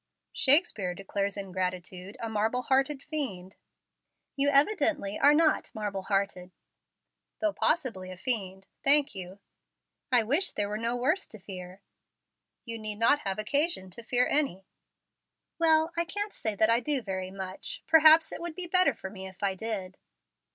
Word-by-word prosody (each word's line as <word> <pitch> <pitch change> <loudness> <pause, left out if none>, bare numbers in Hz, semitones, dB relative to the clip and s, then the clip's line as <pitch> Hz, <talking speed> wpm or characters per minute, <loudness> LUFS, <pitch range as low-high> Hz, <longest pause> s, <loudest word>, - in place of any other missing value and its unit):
"Shakespeare 260 - +4
declares 200 +1 -3
ingratitude 185 0 -5
a 230 - -4
'marble 220 +3 -1
hearted 270 +2 0
fiend.'" 195 - -4 0.8
"You 280 0 +2
evidently 285 - +1
are 290 +2 +5
not 315 0 +2
'marble 205 -3 -4
hearted.'" 195 -2 -2 0.9
"Though 315 -1 0
possibly 230 - 0
a 185 - -9
fiend. 190 -4 -3 0.2
Thank 285 +1 +5
you." 185 0 -8 0.7
"I 245 -3 +4
wish 295 - +1
there 205 -1 -2
were 210 +1 -4
no 230 +1 -1
worse 290 +10 0
to 220 - -11
fear." 185 -1 -10 0.8
"You 230 -2 -6
need 215 -1 -4
not 230 +6 +4
have 195 -7 -3
occasion 280 - 0
to 210 - -10
fear 245 +2 +2
any." 230 -11 -1 0.9
"Well, 320 0 +3
I 340 - +1
can't 410 +5 -4
say 220 -2 -3
that 220 +2 +3
I 230 - +3
do 270 0 -1
very 190 -2 -4
much. 190 0 -7
Perhaps 315 0 +6
it - - -7
would 340 -2 -6
be 365 - -3
better 365 +1 +3
for 190 - -8
me 190 -2 -8
if 190 +1 -12
I 195 -1 +1
did." 190 -2 -5
220 Hz, 160 wpm, -28 LUFS, 190-290 Hz, 0.9 s, Perhaps